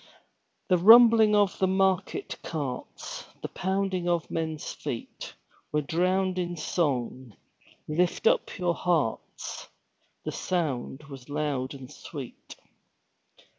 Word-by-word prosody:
The 180 Hz, -2 st, +4 dB
rumbling 225 Hz, +1 st, +8 dB
of 205 Hz, -2 st, +2 dB
the 190 Hz, -, +3 dB
market 190 Hz, -1 st, 0 dB
carts, 140 Hz, -6 st, -5 dB, 0.2 s
The -, -, -1 dB
pounding 190 Hz, -1 st, -1 dB
of 170 Hz, -2 st, 0 dB
men's 160 Hz, -2 st, -3 dB
feet -, -, -6 dB, 0.4 s
Were 150 Hz, 0 st, +1 dB
drowned 185 Hz, +4 st, +1 dB
in 175 Hz, -1 st, -3 dB
song; 130 Hz, -, -2 dB, 0.5 s
"Lift 175 Hz, -, 0 dB
up -, -, +2 dB
your 175 Hz, -2 st, +1 dB
hearts!" 165 Hz, -11 st, -2 dB, 0.6 s
The -, -, -2 dB
sound 150 Hz, -5 st, -2 dB
was 135 Hz, -3 st, -11 dB
loud 145 Hz, -3 st, -2 dB
and 135 Hz, 0 st, -10 dB
sweet. 140 Hz, -3 st, -9 dB
170 Hz, 110 wpm, -27 LUFS, 145-190 Hz, 0.6 s, rumbling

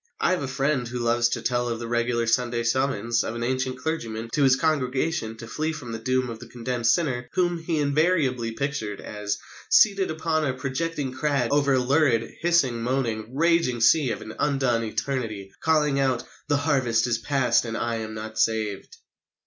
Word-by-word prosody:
I -, -, +2 dB
have 185 Hz, -, 0 dB
a 140 Hz, -, -3 dB
friend 135 Hz, -1 st, 0 dB
who 125 Hz, +1 st, -5 dB
loves 120 Hz, 0 st, +2 dB
to -, -, -3 dB
tell 120 Hz, 0 st, 0 dB
of 115 Hz, -, -2 dB
the 115 Hz, 0 st, -6 dB
regular 120 Hz, 0 st, 0 dB
Sunday 120 Hz, 0 st, +1 dB
summons 115 Hz, -2 st, +1 dB
of 115 Hz, -, -4 dB
an 120 Hz, -, -3 dB
ancient 130 Hz, +1 st, -1 dB
clergyman 115 Hz, -6 st, -4 dB
to 150 Hz, -, +1 dB
his 135 Hz, -2 st, +6 dB
congregation 135 Hz, -4 st, -1 dB
to 115 Hz, -, -9 dB
flee 155 Hz, +5 st, -2 dB
from 135 Hz, -7 st, -7 dB
the 115 Hz, -, -4 dB
doom 130 Hz, +2 st, 0 dB
of 115 Hz, -2 st, -7 dB
the 125 Hz, -, -10 dB
condemned 120 Hz, -1 st, -3 dB
sinner 125 Hz, -1 st, +1 dB
whom 175 Hz, -2 st, +1 dB
he 165 Hz, 0 st, -2 dB
invariably 140 Hz, -5 st, +1 dB
pictured 115 Hz, -6 st, -3 dB
as 105 Hz, -1 st, -4 dB, 0.3 s
"seated 200 Hz, -2 st, +5 dB
upon 160 Hz, 0 st, 0 dB
a 130 Hz, -4 st, -1 dB
projecting 140 Hz, +2 st, -3 dB
crag 135 Hz, -2 st, 0 dB
over 140 Hz, -1 st, +3 dB
a -, -, +3 dB
lurid, 130 Hz, -3 st, +2 dB
hissing, 155 Hz, -9 st, +2 dB
moaning, 120 Hz, -2 st, -2 dB
raging 165 Hz, -6 st, +2 dB
sea 130 Hz, +4 st, +4 dB
of -, -, -4 dB
an 110 Hz, 0 st, -8 dB
undone 135 Hz, -5 st, +1 dB
Eternity, 110 Hz, -3 st, -3 dB
calling 150 Hz, -3 st, +2 dB
out, 130 Hz, -3 st, +1 dB, 0.2 s
'The 145 Hz, -, +2 dB
harvest 130 Hz, -6 st, +1 dB
is 120 Hz, -2 st, 0 dB
past 130 Hz, -1 st, +2 dB
and 115 Hz, -1 st, -4 dB
I 115 Hz, -1 st, -1 dB
am 110 Hz, -1 st, -5 dB
not 110 Hz, 0 st, -7 dB
savèd.'" 110 Hz, -3 st, 0 dB
125 Hz, 190 wpm, -25 LUFS, 115-145 Hz, 0.3 s, his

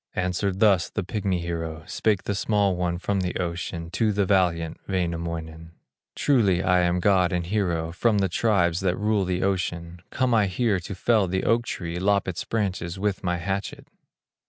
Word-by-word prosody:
Answered 95 Hz, +1 st, -1 dB
thus 100 Hz, -6 st, +4 dB
the -, -, -3 dB
pigmy 95 Hz, -2 st, -2 dB
hero, 80 Hz, -2 st, -4 dB
Spake 105 Hz, -4 st, 0 dB
the 100 Hz, -, -2 dB
small 100 Hz, -1 st, +1 dB
one 90 Hz, -1 st, -1 dB
from 100 Hz, +2 st, -1 dB
the 90 Hz, -1 st, -2 dB
ocean 85 Hz, -1 st, -4 dB
To 105 Hz, +3 st, +1 dB
the 100 Hz, -1 st, +1 dB
valiant 85 Hz, -4 st, +1 dB
Wainamoinen: 85 Hz, -3 st, -3 dB, 0.4 s
"Truly 100 Hz, -10 st, +2 dB
am 90 Hz, -1 st, +3 dB
I -, -, 0 dB
god 90 Hz, -1 st, +3 dB
and 90 Hz, -1 st, -1 dB
hero, 85 Hz, -4 st, -1 dB
From 105 Hz, +5 st, +1 dB
the 100 Hz, -1 st, +2 dB
tribes 90 Hz, -3 st, +1 dB
that 90 Hz, -2 st, 0 dB
rule 105 Hz, -2 st, +1 dB
the 90 Hz, 0 st, -1 dB
ocean; 85 Hz, -3 st, -2 dB
Come 130 Hz, -2 st, 0 dB
I 105 Hz, -3 st, +4 dB
here 100 Hz, +1 st, +1 dB
to 90 Hz, +3 st, -7 dB
fell 105 Hz, 0 st, +2 dB
the 95 Hz, +1 st, -1 dB
oak 120 Hz, +1 st, +2 dB
tree, 85 Hz, -1 st, -4 dB
Lop 100 Hz, +1 st, +2 dB
its 90 Hz, -2 st, -3 dB
branches 95 Hz, -5 st, -2 dB
with 100 Hz, 0 st, -2 dB
my 90 Hz, -1 st, 0 dB
hatchet." 95 Hz, +3 st, -4 dB
90 Hz, 180 wpm, -25 LUFS, 85-100 Hz, 0.4 s, thus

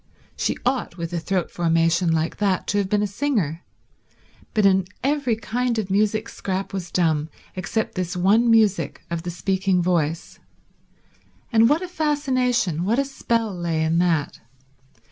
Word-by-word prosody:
She -, -, -1 dB
ought, 250 Hz, -8 st, -1 dB
with 170 Hz, 0 st, -5 dB
a 170 Hz, -, 0 dB
throat 180 Hz, +1 st, -2 dB
formation 165 Hz, 0 st, +2 dB
like 160 Hz, 0 st, 0 dB
that, 195 Hz, -3 st, 0 dB
to 205 Hz, -, +2 dB
have 195 Hz, -2 st, -1 dB
been 210 Hz, 0 st, +2 dB
a -, -, +2 dB
singer, 200 Hz, -, -1 dB, 0.9 s
but 215 Hz, -2 st, +3 dB
in 190 Hz, -1 st, +4 dB, 0.2 s
every 275 Hz, -4 st, +1 dB
kind 235 Hz, +2 st, -2 dB
of 200 Hz, -3 st, -2 dB
music 215 Hz, +2 st, +1 dB
Scrap 190 Hz, 0 st, -4 dB
was 180 Hz, -3 st, -4 dB
dumb 160 Hz, -3 st, +1 dB, 0.3 s
except 190 Hz, +4 st, -2 dB
this 180 Hz, -1 st, -3 dB
one 210 Hz, +6 st, +4 dB
music 205 Hz, -8 st, +2 dB
of 170 Hz, -1 st, -2 dB
the 175 Hz, -, -5 dB
speaking 190 Hz, +1 st, 0 dB
voice; 170 Hz, -2 st, -1 dB, 1.1 s
and 225 Hz, +1 st, +6 dB
what 315 Hz, +5 st, +2 dB
a -, -, -4 dB
fascination, 255 Hz, -, 0 dB
what 215 Hz, +6 st, +1 dB
a 275 Hz, -, +2 dB
spell 230 Hz, -5 st, -1 dB
lay 170 Hz, -2 st, -1 dB
in 160 Hz, +1 st, +2 dB
that. 165 Hz, -5 st, 0 dB
195 Hz, 160 wpm, -23 LUFS, 170-230 Hz, 1.1 s, and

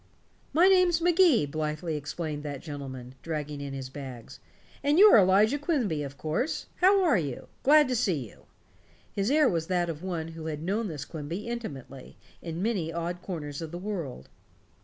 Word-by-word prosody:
"My 345 Hz, +4 st, +5 dB
name's 365 Hz, -3 st, +5 dB
Magee," 345 Hz, -, +4 dB
blithely 155 Hz, +2 st, -3 dB
explained 150 Hz, +1 st, -4 dB
that 145 Hz, -2 st, -6 dB
gentleman, 130 Hz, -5 st, -7 dB
dragging 150 Hz, -3 st, -4 dB
in 140 Hz, -1 st, -5 dB
his 135 Hz, -1 st, -5 dB
bags. 130 Hz, -4 st, -9 dB, 0.4 s
"And 290 Hz, +2 st, +3 dB
you're 415 Hz, +2 st, +9 dB
Elijah 205 Hz, +8 st, +4 dB
Quimby, 260 Hz, -, 0 dB
of 140 Hz, -1 st, -6 dB
course. 160 Hz, -, -2 dB
How 385 Hz, +2 st, +5 dB
are 295 Hz, -, +4 dB
you? 140 Hz, -6 st, -5 dB
Glad 300 Hz, +1 st, +6 dB
to 250 Hz, -, +1 dB
see 170 Hz, -, 0 dB
you." -, -, -19 dB, 0.7 s
His 200 Hz, +2 st, 0 dB
air 300 Hz, 0 st, +5 dB
was 165 Hz, -6 st, -1 dB
that 175 Hz, -2 st, 0 dB
of 155 Hz, -1 st, -9 dB
one 170 Hz, -3 st, -3 dB
who 160 Hz, -1 st, -7 dB
had 155 Hz, -1 st, -4 dB
known 205 Hz, +5 st, -1 dB
this 150 Hz, -5 st, -5 dB
Quimby 165 Hz, +7 st, -6 dB
intimately, 140 Hz, -, -7 dB, 0.2 s
in 165 Hz, +1 st, -4 dB
many 195 Hz, -8 st, -1 dB
odd 170 Hz, +1 st, -4 dB
corners 150 Hz, -6 st, -5 dB
of 165 Hz, -, -5 dB
the 170 Hz, -, -6 dB
world. 175 Hz, -, -5 dB
165 Hz, 175 wpm, -28 LUFS, 150-235 Hz, 0.7 s, you're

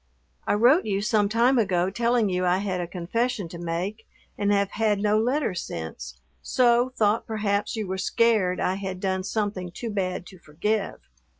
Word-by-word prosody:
I -, -, +3 dB
wrote 250 Hz, -, +4 dB
you 200 Hz, -1 st, -1 dB
some 210 Hz, -2 st, +2 dB
time 240 Hz, +4 st, +3 dB
ago 185 Hz, -3 st, +1 dB
telling 235 Hz, +1 st, +1 dB
you 180 Hz, -1 st, -1 dB
I 180 Hz, 0 st, +3 dB
had 190 Hz, -2 st, -2 dB
a 175 Hz, -, -4 dB
confession 195 Hz, +4 st, -2 dB
to 170 Hz, -, -9 dB
make 180 Hz, +6 st, -4 dB, 0.3 s
and 205 Hz, 0 st, 0 dB
have 200 Hz, -1 st, +1 dB
had 215 Hz, -2 st, +1 dB
no 210 Hz, +1 st, +2 dB
letter 250 Hz, 0 st, 0 dB
since, 80 Hz, -, -6 dB, 0.2 s
so 245 Hz, 0 st, +3 dB
thought 220 Hz, -3 st, +1 dB
perhaps 205 Hz, -1 st, -1 dB
you 220 Hz, -2 st, -2 dB
were 190 Hz, 0 st, -4 dB
scared 195 Hz, -3 st, +2 dB
I 185 Hz, +1 st, 0 dB
had 190 Hz, -2 st, -5 dB
done 190 Hz, -1 st, -1 dB
something 200 Hz, -3 st, -2 dB
too 230 Hz, +5 st, -5 dB
bad 185 Hz, -3 st, -2 dB
to 185 Hz, -, -13 dB
forgive. 195 Hz, +8 st, -2 dB
200 Hz, 180 wpm, -25 LUFS, 185-225 Hz, 0.3 s, wrote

